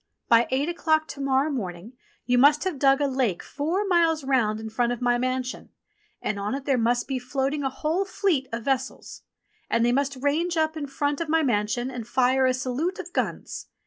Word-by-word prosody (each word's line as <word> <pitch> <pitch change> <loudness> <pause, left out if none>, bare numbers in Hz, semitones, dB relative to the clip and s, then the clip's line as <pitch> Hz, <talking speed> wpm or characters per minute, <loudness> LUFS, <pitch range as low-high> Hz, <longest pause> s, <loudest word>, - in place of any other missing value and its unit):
By 235 0 +5
eight 270 +3 0
o'clock 315 -2 +1
to 280 - -7
morrow 275 +2 +1
morning 195 -3 -5 0.3
you 245 0 +3
must 290 +3 +5
have 365 -7 -3
dug 275 +1 +4
a - - +3
lake 255 -9 0
four 335 +8 -2
miles 335 -4 +2
round 240 -6 +1
in 220 - -6
front 240 +2 +1
of 245 - -3
my 245 -1 +2
mansion, 255 0 -3 0.5
and 205 - -2
on 205 +5 -2
it 275 -1 -6
there 275 - +2
must 240 +1 +1
be 265 -2 -2
float 265 +2 -1
ing 300 - -2
a 270 - +1
whole 310 +7 -1
fleet 370 -8 0
of 230 0 -4
vessels. 265 -1 -3 0.5
And 230 0 +2
they 240 - +3
must 275 +2 0
range 325 +5 0
up 315 0 +1
in 295 -2 -4
front 285 +2 -1
of 330 - -3
my 320 0 +3
mansion 240 +1 0
and 240 -3 -6
fire 260 +1 +3
a 255 - +2
salute 265 +8 -2
of 355 -2 -8
guns. - - -3
270 Hz, 210 wpm, -25 LUFS, 245-305 Hz, 0.5 s, By